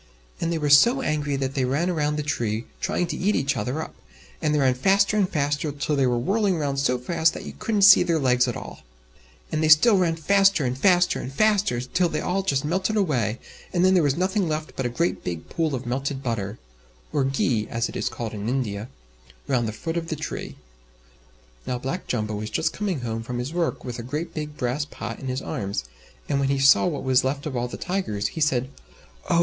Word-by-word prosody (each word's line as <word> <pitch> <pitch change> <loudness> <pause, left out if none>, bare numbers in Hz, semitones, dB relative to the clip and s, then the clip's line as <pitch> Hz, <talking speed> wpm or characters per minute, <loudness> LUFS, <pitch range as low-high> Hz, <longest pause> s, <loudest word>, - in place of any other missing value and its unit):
And 165 - 0
they 165 - 0
were 150 -2 0
so 240 - +6
angry 150 - -1
that 135 -1 -2
they 135 - 0
ran 145 +8 0
round 150 -2 0
the 150 - -1
tree, 115 -5 -2
trying 180 - 0
to - - -4
eat 205 +3 +1
each 140 0 0
other 140 +6 -2
up, - - -10 0.5
and 155 - +1
they 150 - +2
ran 135 -3 +3
faster 195 +10 +3
and 200 -3 +2
faster 145 0 -1
till 145 +1 -2
they 135 -2 +2
were 120 -1 +1
whirling 195 - +1
round 140 -3 -1
so 125 -2 +1
fast 160 +5 +1
that - - -7
you - - -7
couldn't 210 -3 0
see 195 -1 +9
their 165 -1 +1
legs 125 -3 +3
at 120 - -2
all. - - -9 0.7
And 155 - 0
they 155 - +2
still 190 +7 +7
ran 170 -3 +2
faster 195 -1 +3
and 125 0 -1
faster 180 +5 +3
and 130 - -6
faster, 205 - +2
till 170 +8 0
they 155 - -2
all 180 +4 -1
just 140 -7 0
melted 190 +7 0
away, 125 - +1 0.3
and 180 0 +2
then 185 - +5
there 180 - +5
was 145 -1 +1
nothing 190 +1 +1
left 155 0 -4
but 130 - -1
a - - -3
great 170 +8 -1
big 85 -3 -5
pool 160 -4 -1
of 125 - -6
melted 135 +2 -3
butter 110 -3 -3 0.6
(or 145 - +2
"ghi" 130 -4 0
as 115 0 -1
it - - -10
is - - -1
called 120 -2 -5
in 105 +1 -4
India) 115 -4 -2 0.6
round 120 -4 +1
the - - -2
foot 165 +10 -4
of 165 -1 -3
the 160 - -2
tree. 150 +1 -6 1.1
Now 125 - -1
Black 135 +9 -4
Jumbo 110 -3 -2
was 105 +1 -4
just 160 +7 0
coming 190 -9 -2
home 115 -1 -3
from 120 +2 -5
his 125 +6 -4
work, 170 -1 -1
with 125 -1 -5
a - - -3
great 150 +8 -4
big 150 -1 -5
brass 125 +4 -1
pot 150 - -7
in 135 - -7
his 130 +1 -3
arms, 100 -9 -3 0.4
and 140 - 0
when 135 -1 +1
he 140 - +1
saw 135 +5 +5
what 150 -5 -3
was 130 -1 +3
left 140 +2 -2
of 145 -4 -4
all 120 0 -1
the - - -7
Tigers, 140 - -2
he 160 - -6
said, 130 -4 +2 0.6
"Oh! 170 - +4
145 Hz, 230 wpm, -24 LUFS, 125-170 Hz, 1.1 s, see